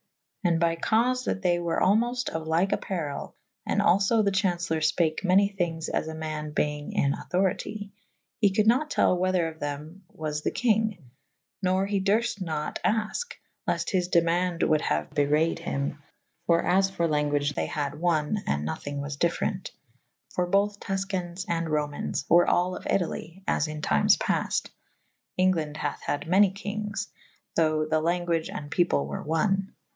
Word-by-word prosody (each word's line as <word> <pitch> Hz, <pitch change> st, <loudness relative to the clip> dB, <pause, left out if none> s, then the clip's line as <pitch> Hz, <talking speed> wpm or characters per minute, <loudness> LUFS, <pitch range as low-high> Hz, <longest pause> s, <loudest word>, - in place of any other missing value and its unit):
And 170 Hz, -3 st, +2 dB
by 165 Hz, 0 st, +2 dB
caufe 245 Hz, +8 st, +1 dB
that 195 Hz, -, -2 dB
they 175 Hz, -1 st, +3 dB
were 170 Hz, -1 st, -1 dB
almolt 240 Hz, +6 st, +2 dB
of 160 Hz, -1 st, -5 dB
lyke 170 Hz, +5 st, +2 dB
apparel 160 Hz, -7 st, -3 dB, 0.2 s
/ -, -, -57 dB
and -, -, +1 dB
alfo 200 Hz, +4 st, +3 dB
the 200 Hz, -, +3 dB
chau«celer 175 Hz, -4 st, 0 dB
fpake 155 Hz, +2 st, +1 dB
many 195 Hz, +2 st, +5 dB
thynges 165 Hz, -3 st, -1 dB
as -, -, -1 dB
a 160 Hz, -, -5 dB
man 155 Hz, -1 st, -4 dB
beynge 150 Hz, 0 st, -2 dB
in 140 Hz, 0 st, +2 dB
auctorite 195 Hz, +2 st, -2 dB, 0.2 s
/ -, -, -53 dB
he 205 Hz, -2 st, +5 dB
coulde 210 Hz, +2 st, +2 dB
nat 260 Hz, +7 st, +3 dB
tell 185 Hz, -, +3 dB
whether 180 Hz, -1 st, +1 dB
of 160 Hz, -1 st, -8 dB
them 150 Hz, +6 st, -6 dB
was 150 Hz, -1 st, -4 dB
the -, -, 0 dB
kynge 220 Hz, -3 st, +1 dB, 0.3 s
/ -, -, -57 dB
nor 185 Hz, 0 st, +2 dB
he 200 Hz, -1 st, 0 dB
durft 215 Hz, +2 st, +1 dB
nat 155 Hz, -4 st, -3 dB
afke 225 Hz, -, 0 dB, 0.2 s
/ -, -, -48 dB
lefte -, -, -1 dB
his 180 Hz, -2 st, +1 dB
demaunde 170 Hz, 0 st, +2 dB
wolde 155 Hz, -1 st, +3 dB
haue 75 Hz, 0 st, 0 dB
bewrayed 150 Hz, +3 st, +2 dB
hym 145 Hz, -3 st, -3 dB, 0.2 s
/ -, -, -48 dB
for 170 Hz, -1 st, +3 dB
as 190 Hz, +1 st, +3 dB
for 170 Hz, -3 st, 0 dB
lan 150 Hz, -1 st, +1 dB
guage 145 Hz, 0 st, 0 dB
they -, -, -2 dB
had 145 Hz, 0 st, -3 dB
one 170 Hz, +2 st, +1 dB
/ -, -, -24 dB
& -, -, -21 dB
nothynge 80 Hz, -, -2 dB
was 140 Hz, 0 st, -4 dB
different 170 Hz, +2 st, -1 dB, 0.3 s
/ -, -, -52 dB
for 180 Hz, -1 st, 0 dB
bothe 200 Hz, +2 st, +1 dB
Tus 195 Hz, -1 st, -2 dB
cains 185 Hz, -1 st, -4 dB
and 165 Hz, -1 st, -1 dB
Romayns 150 Hz, -2 st, -2 dB
were 175 Hz, +1 st, +5 dB
all 180 Hz, +1 st, +2 dB
of -, -, -9 dB
Italye 180 Hz, 0 st, -2 dB
/ -, -, -38 dB
as 150 Hz, -, +1 dB
in 155 Hz, 0 st, -6 dB
tymes 75 Hz, -1 st, +4 dB
paft -, -, -1 dB, 0.3 s
/ -, -, -23 dB
Englande 165 Hz, -5 st, +1 dB
hathe 145 Hz, -2 st, -3 dB
had 145 Hz, +1 st, -3 dB
many 190 Hz, +2 st, +5 dB
kynges 210 Hz, +1 st, -4 dB, 0.2 s
/ -, -, -38 dB
thoughe 155 Hz, -1 st, +2 dB
the 155 Hz, 0 st, +3 dB
language 170 Hz, -1 st, 0 dB
and 145 Hz, 0 st, -7 dB
peple 115 Hz, -, +2 dB
were 70 Hz, 0 st, -5 dB
one. 190 Hz, +5 st, 0 dB
175 Hz, 185 wpm, -27 LUFS, 155-195 Hz, 0.3 s, many